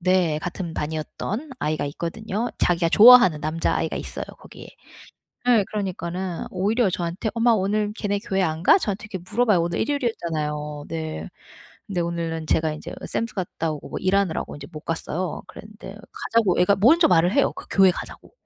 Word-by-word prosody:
네 180 Hz, -4 st, +2 dB
같은 175 Hz, -2 st, -5 dB
반이었던 160 Hz, -, -4 dB
아이가 155 Hz, -1 st, -1 dB
있거든요. 210 Hz, +9 st, -3 dB
자기가 170 Hz, -1 st, +2 dB
좋아하는 215 Hz, -9 st, +8 dB
남자아이가 155 Hz, +2 st, -1 dB
있어요 -, -, -5 dB
거기에. -, -, -13 dB, 0.8 s
네 230 Hz, -5 st, +5 dB
그러니까는 185 Hz, -3 st, -3 dB
오히려 205 Hz, +5 st, +1 dB
저한테 175 Hz, +5 st, -3 dB
"엄마 235 Hz, +1 st, +3 dB
오늘 210 Hz, 0 st, 0 dB
걔네 205 Hz, -2 st, -2 dB
교회 195 Hz, -3 st, -1 dB
안 160 Hz, -1 st, -1 dB
가?" 380 Hz, -, +6 dB
저한테 210 Hz, -, -3 dB
이렇게 185 Hz, -4 st, -6 dB
물어봐요. 215 Hz, -5 st, +3 dB
오늘 170 Hz, 0 st, -2 dB
일요일이었잖아요. 155 Hz, -, -2 dB
네. 160 Hz, -1 st, -5 dB, 0.6 s
근데 195 Hz, -4 st, -2 dB
오늘은 165 Hz, -2 st, -3 dB
제가 160 Hz, -1 st, +1 dB
인제 -, -, -8 dB
샘스 230 Hz, -1 st, -3 dB
갔다 170 Hz, -4 st, -3 dB
오고 150 Hz, -, -8 dB
뭐 -, -, -4 dB
일하느라고 190 Hz, -5 st, 0 dB
이제 145 Hz, -, -9 dB
못 155 Hz, -, -7 dB
갔어요. 165 Hz, +2 st, -3 dB
그랬는데 210 Hz, -1 st, -11 dB, 0.2 s
가자고 220 Hz, -6 st, +1 dB
애가 200 Hz, +3 st, +4 dB
먼저 320 Hz, -, +6 dB
말을 175 Hz, +1 st, +4 dB
해요, 280 Hz, -, +2 dB
그 -, -, -10 dB
교회 190 Hz, -1 st, +6 dB
가자고. -, -, -9 dB
185 Hz, 400 characters per minute, -23 LUFS, 165-210 Hz, 0.8 s, 좋아하는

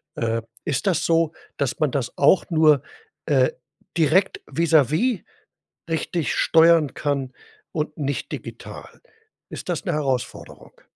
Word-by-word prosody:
Äh, 115 Hz, 0 st, -1 dB, 0.2 s
ist 150 Hz, +7 st, -1 dB
das 180 Hz, -, +1 dB
so, 165 Hz, -1 st, +2 dB, 0.3 s
dass 140 Hz, -2 st, -2 dB
man 155 Hz, -3 st, +1 dB
das 130 Hz, -3 st, -3 dB
auch 145 Hz, +8 st, +4 dB
nur, 155 Hz, -4 st, +4 dB, 0.4 s
äh, -, -, +3 dB, 0.5 s
direkt 165 Hz, +5 st, +2 dB
vis-à-vis 165 Hz, -, +2 dB, 0.7 s
richtig 165 Hz, -1 st, -1 dB
steuern 165 Hz, -2 st, +4 dB
kann 140 Hz, -3 st, -2 dB, 0.4 s
und 155 Hz, 0 st, -3 dB
nicht 140 Hz, -2 st, -3 dB
digital, -, -, -9 dB, 0.5 s
ist -, -, -8 dB
das -, -, -2 dB
'ne 175 Hz, -, -1 dB
Herausforderung? 135 Hz, -5 st, -4 dB
155 Hz, 120 wpm, -23 LUFS, 140-165 Hz, 0.7 s, auch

